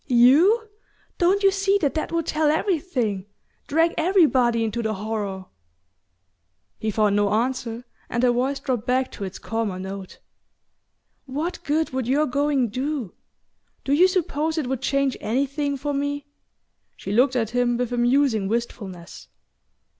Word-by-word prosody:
You? 300 - +5 0.5
Don't 385 +3 +3
you 390 - +6
see 395 +1 +2
that 290 -8 0
that 315 - -3
would 335 -1 -1
tell 310 -1 +1
everything 290 - -1 0.4
drag 325 +3 +2
everybody 270 - +3
into 225 +2 -2
the 220 -1 -2
horror?" 200 -2 -4 1.3
He 220 - -2
found 210 -1 +2
no 205 -1 +2
answer, 235 +1 -1 0.2
and 240 - -1
her 250 - +5
voice 260 +3 0
dropped 250 -5 -3
back 255 +1 +1
to 200 - -6
its 190 - -7
calmer 225 -4 -3
note. 190 0 -7 1.1
"What 305 +7 -4
good 310 +2 0
would 260 -2 -2
your 285 +4 +2
going 280 -2 +1
do? 260 - -3 0.7
Do 275 - 0
you 350 +6 +6
suppose 320 -4 -1
it 310 - 0
would 260 0 -3
change 275 -1 +1
anything 280 +5 -1
for 290 +2 -3
me?" 285 0 -2 0.7
She - - -6
looked 255 +5 +3
at 225 -3 0
him 245 -1 +1
with 245 0 -2
a - - -1
musing 240 -4 +2
wistfulness. 200 -6 -5
260 Hz, 150 wpm, -23 LUFS, 225-295 Hz, 1.3 s, you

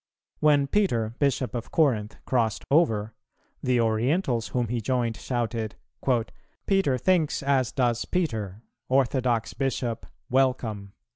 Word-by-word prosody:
When 145 -2 +4
Peter, 120 - +1
Bishop 135 -3 +1
of 120 -2 -4
Corinth, 115 -10 +1
crossed 115 -5 0
over, 110 -9 +2 0.5
the 125 -1 +2
Orientals 115 - +1
whom 120 -3 -1
he 120 -1 -1
joined 120 -1 0
shouted, 115 -2 -3 0.9
"Peter 195 -10 +2
thinks 160 0 +1
as 135 -3 +2
does 120 -3 0
Peter; 110 - -2 0.3
orthodox 130 -3 +1
Bishop, 125 -4 -2 0.2
welcome." 120 -6 0
125 Hz, 115 wpm, -26 LUFS, 115-140 Hz, 0.9 s, When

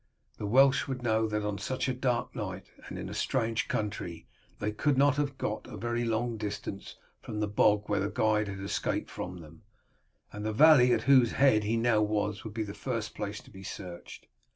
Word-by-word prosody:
The 105 - -3
Welsh 135 +6 +4
would 130 -2 -4
know 110 -1 +2
that 105 -1 -2
on 105 -1 -2
such 130 +7 -2
a 130 - 0
dark 125 -1 -1
night, 95 -5 -6 0.2
and - - -7
in - - -5
a - - -6
strange 115 -3 0
country, 90 -6 -3 0.3
they 105 +1 -2
could 135 +6 +1
not 140 +1 +4
have 140 -2 -1
got 105 - -3
a - - -8
very 120 0 -2
long 115 +1 -1
distance 100 -2 -5 0.3
from 105 - -5
the 105 - 0
bog 105 0 +3
where 105 - +1
the 100 - -1
guide 105 -1 +1
had 100 -1 -6
escaped 100 - -2
from 90 -1 -6
them, 80 0 -14 0.7
and 105 - -6
the 110 0 -1
valley 135 -1 +7
at - - +2
whose 130 -4 +5
head 120 -6 +4
he 115 +2 +1
now 115 -2 +3
was 105 0 -1
would 110 -2 -8
be 110 - -1
the 100 -1 -6
first 115 +1 -4
place 100 0 -5
to - - -18
be 95 -2 -11
searched. 90 -2 -8
110 Hz, 210 wpm, -30 LUFS, 105-125 Hz, 0.7 s, valley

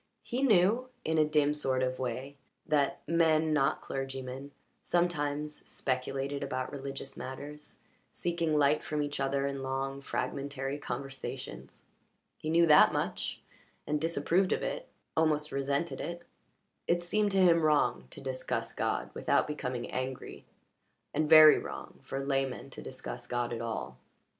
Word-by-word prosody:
He 250 +2 -2
knew, 230 +1 +4 0.2
in 160 0 +2
a 155 - +5
dim 150 -1 +3
sort 130 -3 0
of 130 0 -1
way, 130 +2 -3 0.3
that 145 -2 +1
men 160 -2 +3
not 150 0 +2
clergymen 135 0 -5 0.3
sometimes 150 -4 0
speculated 135 +2 -2
about 130 -2 -3
religious 135 -1 -6
matters, 145 +3 -8 0.3
seeking 170 -3 0
light 145 +1 +3
from 150 -1 -1
each 145 -1 -4
other 135 0 +1
in 140 -1 -3
long, 135 +1 -3
fragmentary 140 0 -3
conversations. 130 - -6 0.5
He 155 - -5
knew 170 +1 +5
that 150 -2 +7
much, - - -2 0.4
and 150 0 -1
disapproved 170 +3 +2
of - - -2
it - - -3 0.3
almost 155 -1 +2
resented 140 +4 -1
it. 170 0 -5 0.6
It 175 0 +2
seemed 210 +4 +1
to - - +2
him 175 -3 +6
wrong 145 - +2
to - - -11
discuss 130 -1 -3
God - - -1
without - - +2
becoming 125 -5 -4
angry, 130 0 -5 0.7
and 155 0 +1
very 155 -1 +10
wrong - - -8
for 135 0 -4
laymen 135 -1 -1
to - - -8
discuss 125 -2 -7
God 120 -1 -1
at 115 - -4
all. 110 - -4
140 Hz, 145 wpm, -31 LUFS, 135-155 Hz, 0.7 s, very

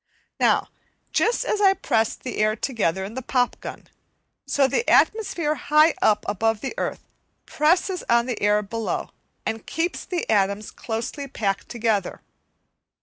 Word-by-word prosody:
Now, - - +3 0.4
just 470 - +1
as 420 - 0
I 390 -1 +5
pressed 225 - 0
the 250 - -5
air 215 0 +2
together 200 -7 -1
in 205 - -8
the 260 - -4
pop 250 -1 0
gun, - - -8 0.6
so 275 0 +3
the 470 - 0
atmosphere 345 -8 +3
high 305 +1 +4
up 210 -1 +3
above 220 +2 0
the 270 - -4
earth - - -4 0.4
presses 350 +4 +1
on 235 0 +4
the 245 -3 -4
air 210 +1 +3
below 225 +2 -3 0.3
and 225 0 -4
keeps 335 +2 -2
the 355 -2 -3
atoms 200 0 +1
closely 235 +5 -4
packed 200 -7 -2
together. 220 -5 -1
235 Hz, 145 wpm, -24 LUFS, 215-305 Hz, 0.6 s, I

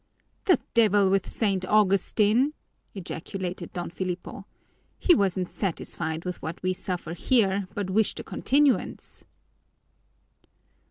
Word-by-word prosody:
"The 370 - +4
devil 205 -4 +4
with 195 -1 +1
St. 195 -4 0
Augustine!" 210 - +3 0.4
ejaculated 180 0 -5
Don 175 -2 -5
Filipo. 185 +2 -5 0.5
"He 360 - +5
wasn't 190 - +1
satisfied 165 -4 -3
with 180 -1 -4
what 165 +3 -6
we 185 0 +1
suffer 180 -3 -5
here 195 -1 +2
but 200 -2 -2
wished 215 +2 +1
a - - -5
continuance." 280 0 0
195 Hz, 110 wpm, -26 LUFS, 180-210 Hz, 0.5 s, He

